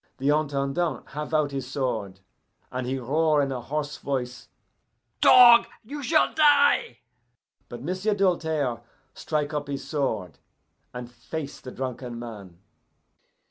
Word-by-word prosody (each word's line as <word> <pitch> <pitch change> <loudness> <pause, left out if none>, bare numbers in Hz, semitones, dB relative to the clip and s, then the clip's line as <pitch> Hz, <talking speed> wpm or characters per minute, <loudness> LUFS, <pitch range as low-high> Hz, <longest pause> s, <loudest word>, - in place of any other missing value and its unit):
The 135 +2 0
Intendant 145 +2 -1
have 150 +1 -6
out 155 -2 +1
his 135 -2 -5
sword, 110 -9 -3 0.5
and 125 0 -4
he 130 +1 -1
roar 150 +4 +1
in 140 -1 0
a 125 -2 -4
hoarse 150 +2 -4
voice, 125 -3 -4 0.7
'Dog, 240 -2 +8 0.2
you 285 +6 -7
shall 310 +3 +2
die!' 290 - +4 0.7
But 120 0 -8
M'sieu' 185 +6 -1
Doltaire 160 - 0 0.3
strike 150 -1 -3
up 145 -1 -3
his 140 -1 -5
sword, 120 - -3 0.5
and 125 -1 -8
face 145 +3 -7
the 130 - -9
drunken 125 -2 -5
man. 105 -7 -9
140 Hz, 130 wpm, -25 LUFS, 125-160 Hz, 0.7 s, Dog